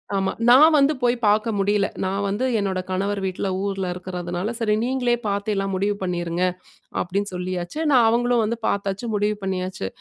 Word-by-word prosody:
ஆமா. 195 Hz, 0 st, +1 dB, 0.2 s
நான் 290 Hz, +7 st, +8 dB
வந்து 290 Hz, +1 st, +4 dB
போய் 240 Hz, 0 st, +3 dB
பாக்க 215 Hz, +2 st, +3 dB
முடில. 200 Hz, 0 st, +2 dB, 0.2 s
நான் 195 Hz, +1 st, -1 dB
வந்து 205 Hz, +6 st, -1 dB
என்னோட 190 Hz, -2 st, -1 dB
கணவர் 195 Hz, +2 st, -1 dB
வீட்ல 190 Hz, +1 st, -2 dB, 0.2 s
ஊர்ல 195 Hz, -1 st, -2 dB
இருக்கிறதுனால, 180 Hz, +2 st, -4 dB
"சரி 215 Hz, -2 st, +1 dB
நீங்களே 250 Hz, -1 st, +1 dB
பாத்து 200 Hz, +1 st, -1 dB
எல்லாம் 195 Hz, 0 st, -1 dB
முடிவு 200 Hz, +2 st, 0 dB
பண்ணீருங்க", 175 Hz, -1 st, -2 dB, 0.6 s
அப்டின்னு 200 Hz, +2 st, -2 dB
சொல்லியாச்சு. 180 Hz, -, -4 dB
நான் 250 Hz, -4 st, +6 dB
அவங்களும் 240 Hz, +1 st, +2 dB
வந்து 230 Hz, +2 st, -1 dB
பாத்தாச்சு, 200 Hz, +2 st, -2 dB
முடிவு 210 Hz, +1 st, +1 dB
பண்ணியாச்சு. 185 Hz, -, -3 dB
200 Hz, 160 wpm, -23 LUFS, 185-225 Hz, 0.6 s, நான்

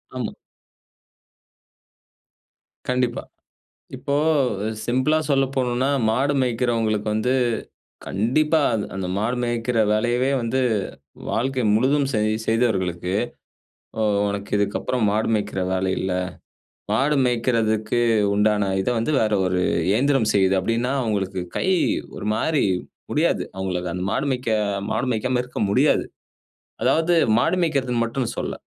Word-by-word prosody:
ஆமா. 125 Hz, -3 st, -3 dB, 2.6 s
கண்டிப்பா. 125 Hz, -1 st, 0 dB, 0.7 s
இப்போ 140 Hz, -, -3 dB, 0.5 s
அ -, -, 0 dB, 0.2 s
சிம்பிளா 130 Hz, +6 st, +2 dB
சொல்ல 135 Hz, -1 st, +3 dB
போணும்ன்னா, 125 Hz, 0 st, +1 dB, 0.2 s
மாடு 135 Hz, +6 st, +1 dB
மேய்க்கிறவங்களுக்கு 115 Hz, -3 st, 0 dB
வந்து 125 Hz, +4 st, +1 dB, 0.7 s
கண்டிப்பா, 150 Hz, -, +1 dB
அது 105 Hz, -2 st, -1 dB
அந்த 95 Hz, -2 st, -3 dB
மாடு 120 Hz, +4 st, -1 dB
மேய்க்கிற 120 Hz, 0 st, -1 dB
வேலையவே 120 Hz, +4 st, +1 dB
வந்து 115 Hz, +3 st, 0 dB, 0.7 s
வாழ்க்கை 130 Hz, +2 st, 0 dB
முழுதும் 135 Hz, +5 st, +2 dB
செய் 110 Hz, -2 st, +1 dB
செய்தவர்களுக்கு, 95 Hz, -7 st, 0 dB, 0.9 s
அ -, -, +1 dB, 0.3 s
"உனக்கு 100 Hz, 0 st, -4 dB
இதுக்கப்புறம் 105 Hz, +4 st, -1 dB
மாடு 110 Hz, +1 st, 0 dB
மேய்க்கிற 100 Hz, -3 st, -2 dB
வேலை 95 Hz, 0 st, 0 dB
இல்ல. 95 Hz, 0 st, -2 dB, 0.8 s
மாடு 135 Hz, +7 st, +2 dB
மேய்க்கிறதுக்கு 115 Hz, -2 st, +1 dB, 0.3 s
உண்டான 105 Hz, 0 st, +2 dB
இத 95 Hz, -, -1 dB
வந்து 115 Hz, +7 st, -1 dB
வேற 110 Hz, -1 st, +1 dB
ஒரு 90 Hz, 0 st, 0 dB, 0.3 s
இயந்திரம் 130 Hz, +1 st, +2 dB
செய்யுது" 95 Hz, -1 st, +3 dB
அப்டின்னா, 115 Hz, +7 st, -1 dB
அவுங்களுக்கு 100 Hz, -5 st, -2 dB, 0.2 s
கை -, -, -1 dB, 0.5 s
ஒரு 105 Hz, -, -5 dB
மாரி 155 Hz, +6 st, +1 dB, 0.5 s
முடியாது. -, -, +1 dB
அவுங்களுக்கு 90 Hz, -2 st, -3 dB
அந்த 90 Hz, -, -3 dB
மாடு 140 Hz, -, 0 dB
மேய்க்க 125 Hz, -2 st, -2 dB, 0.4 s
மாடு -, -, 0 dB
மேய்க்காம 125 Hz, +3 st, 0 dB
இருக்க 125 Hz, -, -7 dB
முடியாது. 100 Hz, -, +3 dB, 0.8 s
அதாவது 165 Hz, +2 st, +3 dB, 0.2 s
மாடு -, -, +2 dB
மேய்க்கிறதுன்னு 130 Hz, -7 st, 0 dB
மட்டுன்னு 120 Hz, +1 st, -2 dB
சொல்லல. -, -, -3 dB
115 Hz, 115 wpm, -22 LUFS, 105-130 Hz, 2.6 s, சொல்ல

